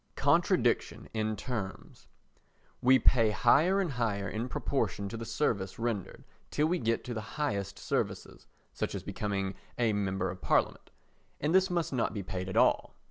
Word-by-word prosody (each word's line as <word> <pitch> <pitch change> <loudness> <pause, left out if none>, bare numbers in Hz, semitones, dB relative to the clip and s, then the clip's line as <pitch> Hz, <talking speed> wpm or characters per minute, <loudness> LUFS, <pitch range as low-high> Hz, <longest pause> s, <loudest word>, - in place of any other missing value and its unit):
Contradiction - - +2
in 110 -1 -1
Terms 105 -6 -6 0.7
We 130 +1 +6
pay 115 -4 +4
higher 145 - +4
and 185 -6 0
higher 110 -6 -1
in 115 +3 -3
proportion 105 -9 -1
to 115 - -6
the 115 0 -5
service 100 -10 -1
rendered 115 -5 -3 0.3
till 150 - +1
we 175 +3 +1
get 115 -1 0
to 125 - -5
the 110 +5 -7
highest 100 -9 -2
services, - - -3 0.3
such - - -3
as - - -5
becoming 100 -2 -2 0.2
a 115 -3 +2
Member 95 -3 -1
of 90 -1 -10
Parliament, - - +1 0.5
and 150 +3 0
this 190 +1 +5
must 170 -5 -1
not 115 -2 0
be 100 - -3
paid 95 0 -4
at 95 - -3
all. - - +3
115 Hz, 165 wpm, -31 LUFS, 100-130 Hz, 0.7 s, We